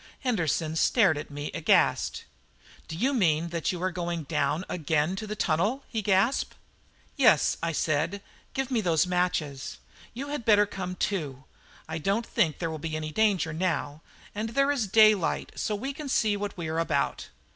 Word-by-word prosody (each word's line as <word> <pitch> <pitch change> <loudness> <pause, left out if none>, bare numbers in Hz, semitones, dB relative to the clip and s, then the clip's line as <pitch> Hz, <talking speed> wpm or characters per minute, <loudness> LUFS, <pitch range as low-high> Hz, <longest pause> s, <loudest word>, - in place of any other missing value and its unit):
Henderson 165 - 0
stared 190 0 +4
at 155 - -8
me 145 0 -5
aghast. - - +2 0.6
"Do 160 - -6
you 265 +9 +1
mean 170 - +2
that 170 -1 -1
you 180 - -5
are 185 - +1
going 170 -2 -3
down 155 +4 -1
again 155 +1 0
to 215 - -5
the 210 - -4
tunnel?" 205 - 0
he 225 - -2
gasped. 200 +5 +1 0.6
"Yes," 230 - +4
I 165 0 0
said; 160 +6 -1 0.3
"give 270 0 -2
me 235 -3 +2
those 165 -4 +2
matches. 175 -6 -1 0.4
You 275 +4 -5
had 290 -4 -3
better 210 -2 +5
come 185 -2 -5
too. 150 -10 -3 0.4
I 160 +1 -4
don't 200 +8 0
think 160 -8 +1
there 165 -2 -3
will 160 - -5
be 155 +1 -3
much 155 0 -5
danger 195 -6 +2
now; 160 -3 -2 0.3
and 215 +2 -3
there 275 +4 +2
is 250 -7 0
daylight, 215 -3 +4
so 215 - -1
we 265 +7 -4
can 290 0 -7
see 215 -5 +2
what 205 -1 -4
we 170 -2 -4
are 160 +1 -1
about." 150 -4 -1
180 Hz, 180 wpm, -27 LUFS, 160-215 Hz, 0.6 s, better